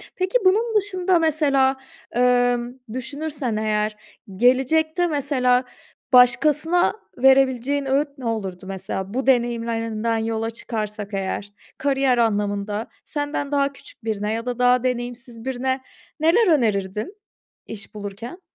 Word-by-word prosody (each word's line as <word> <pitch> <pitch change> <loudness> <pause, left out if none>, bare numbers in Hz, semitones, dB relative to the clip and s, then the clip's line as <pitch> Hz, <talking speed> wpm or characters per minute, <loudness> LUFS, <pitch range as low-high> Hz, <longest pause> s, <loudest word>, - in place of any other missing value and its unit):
Peki 375 +6 +1
bunun 440 +5 +3
dışında 370 -3 +2
mesela, 280 -4 +2 0.3
emm, 245 0 +2 0.2
düşünürsen 280 -1 -4
eğer, 215 0 -1 0.4
gelecekte 315 - +3
mesela, 265 -5 +1 0.5
başkasına 300 +8 +4 0.2
verebileceğin 265 +1 +3
öğüt 275 +3 +1
ne 260 - -8
olurdu 195 -5 -3
mesela? 190 +1 -5
Bu 260 +2 -2
deneyimlerinden 230 -2 0
yola 225 0 -2
çıkarsak 210 -3 -5
eğer 195 +1 -3 0.3
kariyer 270 -2 +2
anlamında, 205 -1 0 0.2
senden 290 -1 -3
daha 280 -1 +1
küçük 260 - -16
birine 215 -1 -2
ya 230 +1 -3
da 245 -1 -3
daha 250 0 +4
deneyimsiz 240 -1 -4
birine 260 0 -1 0.4
neler 340 +7 +4
önerirdin 215 - 0 0.5
iş 215 0 -9
bulurken? 210 - -7
250 Hz, 115 wpm, -22 LUFS, 225-285 Hz, 0.5 s, başkasına